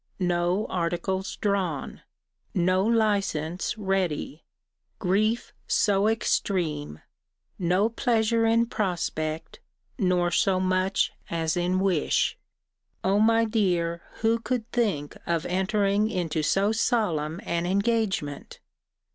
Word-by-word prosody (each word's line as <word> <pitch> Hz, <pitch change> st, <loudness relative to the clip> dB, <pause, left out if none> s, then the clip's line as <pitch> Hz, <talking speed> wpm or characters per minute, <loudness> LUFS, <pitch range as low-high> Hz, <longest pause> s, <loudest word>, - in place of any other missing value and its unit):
No 180 Hz, +2 st, +1 dB
articles 180 Hz, +2 st, -2 dB
drawn. 190 Hz, -8 st, -2 dB, 0.5 s
No 185 Hz, +1 st, +2 dB
license 200 Hz, -6 st, 0 dB
ready. 190 Hz, -7 st, -2 dB, 0.5 s
Grief 215 Hz, +5 st, 0 dB
so 200 Hz, -1 st, +2 dB
extreme: 170 Hz, -, -1 dB, 0.6 s
no 185 Hz, +4 st, +2 dB
pleasure 230 Hz, -1 st, +1 dB
in 230 Hz, +1 st, +3 dB
prospect, 165 Hz, -7 st, -3 dB, 0.4 s
nor 180 Hz, -3 st, +2 dB
so 185 Hz, +2 st, +2 dB
much 185 Hz, +1 st, +1 dB, 0.2 s
as 165 Hz, -1 st, -1 dB
in 180 Hz, +1 st, +1 dB
wish 190 Hz, -6 st, +1 dB, 0.7 s
O 195 Hz, +2 st, +2 dB
my 225 Hz, +1 st, +4 dB
dear, 175 Hz, -6 st, 0 dB, 0.2 s
who 225 Hz, +1 st, +2 dB
could 235 Hz, -1 st, -2 dB
think 195 Hz, -12 st, -1 dB
of 170 Hz, -2 st, 0 dB
entering 200 Hz, +3 st, +1 dB
into 170 Hz, -6 st, -1 dB
so 195 Hz, +7 st, +2 dB
solemn 180 Hz, -9 st, 0 dB
an 170 Hz, 0 st, -1 dB
engagement? 200 Hz, -7 st, -1 dB
190 Hz, 100 wpm, -26 LUFS, 170-215 Hz, 0.7 s, my